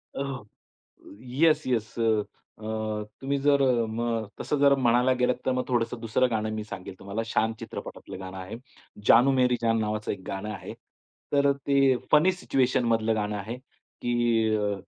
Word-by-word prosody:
ओह! 135 -4 -4 0.8
Yes 150 +5 +2
yes. 115 -4 -1
अ, 110 -1 -2 0.6
तुम्ही 140 +1 -1
जर 140 0 +3
अ, 120 -3 +3
मग 115 0 -2
तसं 150 - -1
जर 140 0 +6
म्हणायला 125 0 +3
गेलात 125 0 +3
तर 130 - +3
मग 125 0 0
थोडंसं 120 -1 -1
दुसरं 120 +2 +1
गाणं 110 -1 -1
मी 110 -1 -4
सांगेल 95 -3 -8
तुम्हाला. 100 +3 -4
"शान" 110 0 +1
चित्रपटातलं 115 -4 -8
गाणं 95 0 -8
आहे. 95 +4 -7 0.5
"जानू 125 +4 +7
मेरी 125 -2 +3
जान" 115 0 +2
नावाचं 105 0 -2
एक 95 - -8
गाणं 95 +2 -4
आहे. 100 - -8 0.6
तर 140 -1 +4
ते 135 -1 +2 0.2
फनी 155 +5 +6
सिच्युएशनमधलं 120 -8 +1
गाणं 105 -1 -2
आहे, 110 +5 -5
की 120 -3 -1
अ, 105 -1 0
120 Hz, 155 wpm, -27 LUFS, 110-130 Hz, 0.8 s, जानू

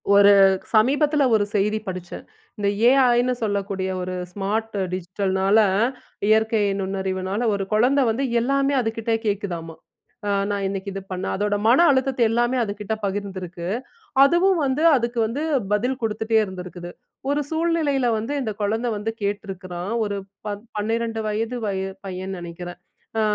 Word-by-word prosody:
ஒரு 200 0 +8 0.4
சமீபத்தில 290 +6 +3
ஒரு 210 - +3
செய்தி 210 +2 +1
படிச்சேன். 180 -2 -6 0.3
இந்த 205 -1 -1 0.2
ஏஐ 255 -2 +5
னு 255 - +2
சொல்லக்கூடிய 200 -2 -1
ஒரு 185 0 -4 0.2
ஸ்மார்ட் 210 +4 -2 0.2
டிஜிட்டல்னால 190 +2 +1 0.7
இயற்கை 220 0 +3 0.2
நுண்ணறிவுனால 190 +1 -2
ஒரு 200 -1 -1
குழந்தை 255 +6 +4
வந்து 245 +5 0 0.2
எல்லாமே 275 +3 +1
அதுக்கிட்ட 225 0 -2
கேட்குதாம்மா! 175 -5 -3 0.5
அ - - 0 0.2
நான் 200 -1 -1
இன்னைக்கி 195 0 -4
இது 195 - -5
பண்ண 185 0 -3
அதோட 205 +1 0
மன 260 +9 +6
அழுத்தத்த 265 -1 0
எல்லாமே 240 +3 +1
அதுக்கிட்ட 205 0 -4
பகிர்ந்திருக்கு. 190 -3 -4 0.6
அதுவும் 345 +5 +4
வந்து 270 +3 0
அதுக்கு 240 -1 -1
வந்து 250 +7 -3 0.3
பதில் 250 +6 0
கொடுத்துட்டே 220 0 0
இருந்திருக்குது. 180 -2 -7 0.4
ஒரு 290 +1 +1
சூழ்நிலையில 320 -6 +1
வந்து 225 +6 -3
இந்த 225 -4 -2
குழந்தை 220 +4 0
வந்து 215 +2 -2
கேட்டிருக்கிறான், 190 -2 -4
ஒரு 205 -1 -3 0.3
பத் 205 0 -4
12 225 +1 -1
வயது 225 +3 -2
வய 195 -2 -1 0.2
பையன்னு 190 0 -5
நினைக்கிறேன். 175 +1 -8 0.4
ஆ - - +3
210 Hz, 135 wpm, -23 LUFS, 190-240 Hz, 0.7 s, ஒரு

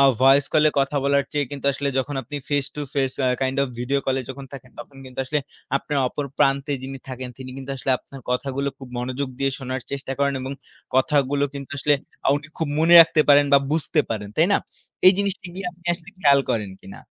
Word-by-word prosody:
আ - - +7 0.2
voice 135 +2 +6
কলে 155 0 +6
কথা 140 +2 +1
বলার 140 -1 +3
চেয়ে 145 -2 0
কিন্তু 140 -1 -5
আসলে 140 +1 -2
যখন 140 +2 -2
আপনি 145 +5 -7
face 145 -2 0
to 150 - -5
face, 135 -2 0
a - - +4
kind 130 +1 0
of - - +1
video 140 +3 +1
call 135 0 +1
এ - - -6
যখন 135 +1 -8
থাকেন, 130 -2 -10
তখন 135 +3 -10
কিন্তু 130 0 -12
আসলে 150 +3 0 0.4
আপনার 145 +1 -2
অপর 145 +3 -4
প্রান্তে 140 +1 +2
যিনি 135 0 -6
থাকেন, 130 -1 -5
তিনি 130 -1 -8
কিন্তু 135 0 -7
আসলে 130 +1 -2
আপনার 135 - -13
কথাগুলো 135 +2 -1
খুব 130 - -10
মনোযোগ 130 +2 -3
দিয়ে 135 0 +1
শোনার 130 -1 -4
চেষ্টা 140 -1 -4
করেন। 140 -1 +2
এবং 130 - -4 0.4
কথাগুলো 140 +1 +2
কিন্তু 140 0 -7
আসলে 145 +1 +3 0.3
আ - - +4
উনি 145 - -7
খুব 160 -3 -1
মনে 170 +2 +6
রাখতে 160 -1 +5
পারেন 145 0 +7
বা, 140 - +9
বুঝতে 160 0 +1
পারেন। 105 -2 -3
তাই 160 - +5
না? - - +4 0.5
এই 185 - +10
জিনিসটি 200 -2 -2
গিয়ে 190 -1 -5
আপনি 175 0 -26
আসলে 170 +2 -14
খেয়াল 140 -5 +5
করেন 105 -4 -1
কিনা? 95 - -11
140 Hz, 220 wpm, -23 LUFS, 130-145 Hz, 0.5 s, এই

